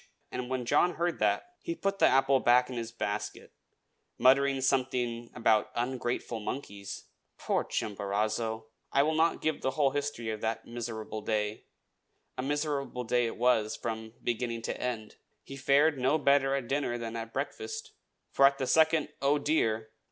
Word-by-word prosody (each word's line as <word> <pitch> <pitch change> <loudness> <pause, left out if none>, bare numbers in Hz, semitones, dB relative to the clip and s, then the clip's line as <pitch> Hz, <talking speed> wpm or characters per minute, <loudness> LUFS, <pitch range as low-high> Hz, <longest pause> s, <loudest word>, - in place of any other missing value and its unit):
And 125 0 -4
when 130 -2 -2
John 175 +8 +3
heard 170 0 -1
that 355 0 0
he 335 - -3
put 195 - -2
the - - +6
apple 135 +1 +4
back 125 +1 +4
in - - -5
his 115 -1 -4
basket, 105 -2 -4 0.6
muttering 135 +1 +4
something 125 -3 0
about 115 -3 +3
ungrateful 120 -1 -2
monkeys. 100 -4 -6 0.3
Poor - - 0
Chimborazo! 110 +2 -2 0.3
I 140 - +4
will 155 +2 +1
not 160 +2 +2
give 155 -2 0
the - - +1
whole 140 -3 +4
history 140 -5 -2
of 110 - -5
that 110 0 -2
miserable 115 -2 -5
day, 105 0 -2 0.7
a - - -3
miserable 145 -2 -2
day 120 0 +1
it - - -6
was 115 -3 +2
from 110 -1 -5
beginning 115 -1 -2
to - - -4
end. 115 -4 -4 0.3
He 135 - -9
fared 140 +2 +3
no 135 +5 +3
better 140 -2 +3
at 135 -3 -3
dinner 135 -3 0
than 115 -1 -5
at 115 0 -5
breakfast; 435 - -4 0.4
for 135 - +6
at 140 0 0
the 135 - -1
second 160 +2 +3
"Oh, 140 +2 +3
dear!" 115 -7 0
125 Hz, 165 wpm, -30 LUFS, 115-140 Hz, 0.7 s, the